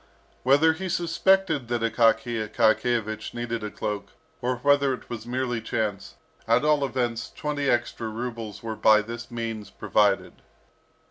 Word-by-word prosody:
Whether 145 +5 +5
he 185 +3 -5
suspected 170 -4 +2
that 120 -1 -1
Akaky 115 -1 +2
Akakiyevich 110 -1 +1
needed 120 -1 -3
a 105 - -3
cloak, 105 -1 -5 0.3
or 125 +1 0
whether 140 +1 +3
it - - -16
was 115 -1 -6
merely 125 -2 -1
chance, 105 -3 -3 0.3
at 120 +5 +3
all 150 -2 +3
events, 120 -4 -2
twenty 145 -2 -2
extra 120 -1 0
rubles 115 -2 -6
were 110 -1 -4
by 110 0 +5
this 115 +1 -7
means 115 -3 -5
provided. 100 0 +1
120 Hz, 140 wpm, -26 LUFS, 110-130 Hz, 0.3 s, Whether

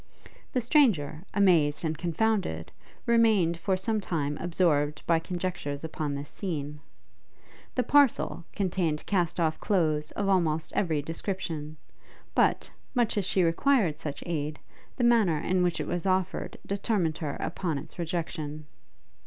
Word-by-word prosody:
The 255 - +1
stranger, 215 - +3
amazed 170 -7 +3
and 160 0 0
confounded, 175 - -1 0.3
remained 220 -8 +4
for 190 +2 +1
some 215 +3 -1
time 150 -6 -1
absorbed 160 -4 +1
by 165 -1 +3
conjectures 175 -4 -4
upon 155 -2 -3
this 140 +1 -5
scene. 150 -6 -4 1.0
The 250 - +2
parcel 280 -8 +3
contained 175 -5 -1
cast 175 -4 0
off 160 -2 +1
clothes 155 -6 +1
of 200 - -1
almost 160 -5 +1
every 160 -6 0
description; 160 -2 -4 0.6
but, - - +2 0.2
much 240 -3 +2
as 205 -3 0
she 185 -1 +2
required 170 - +2
such 145 -3 -5
aid, 150 -3 -2 0.4
the 245 - -1
manner 225 -9 +4
in 180 +4 +1
which 175 -1 +1
it - - -2
was 175 +2 -2
offered 185 0 0
determined 195 -5 0
her 150 -3 -3
upon 165 -2 -2
its 150 +5 -9
rejection. 160 -3 -3
170 Hz, 135 wpm, -28 LUFS, 155-195 Hz, 1.0 s, remained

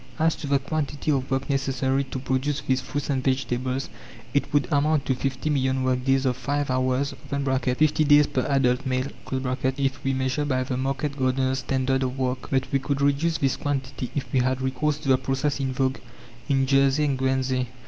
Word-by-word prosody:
As 160 0 +2
to 150 - -6
the 140 0 +3
quantity 145 +1 -2
of 135 -2 0
work 135 +1 -1
necessary 135 -1 0
to 130 - -6
produce 130 +2 -1
these 130 -1 0
fruits 145 +3 -3
and 130 -2 -1
vegetables, 130 0 -1 0.5
it 140 - 0
would 145 -1 +2
amount 150 0 +2
to 130 - +2
fifty 135 +3 -2
million 130 -2 +1
work 130 -1 +1
days 135 +1 +2
of 125 -2 +1
five 145 0 -1
hours 130 +2 0 0.2
(50 140 +2 +1
days 145 0 +6
per 130 - -1
adult 135 -2 +2
male), 130 +1 0 0.5
if 135 +1 0
we 135 - +1
measure 130 +2 0
by 130 -3 0
the 130 0 -3
market 135 +2 -2
gardeners' 130 0 +1
standard 130 +1 0
of 130 0 -2
work. 130 -1 -2
But 135 -1 0
we 135 - +2
could 140 +1 -2
reduce 145 +4 +2
this 135 -3 0
quantity 135 -3 -3
if 145 - -1
we 130 - +4
had 130 +1 +1
recourse 145 +3 0
to 150 - -9
the 130 -1 +4
process 135 +2 -1
in 135 -1 -1
vogue 130 0 0 0.5
in 135 -1 +3
Jersey 135 +2 +3
and 140 -2 +1
Guernsey. 130 -1 0
135 Hz, 195 wpm, -25 LUFS, 130-140 Hz, 0.5 s, days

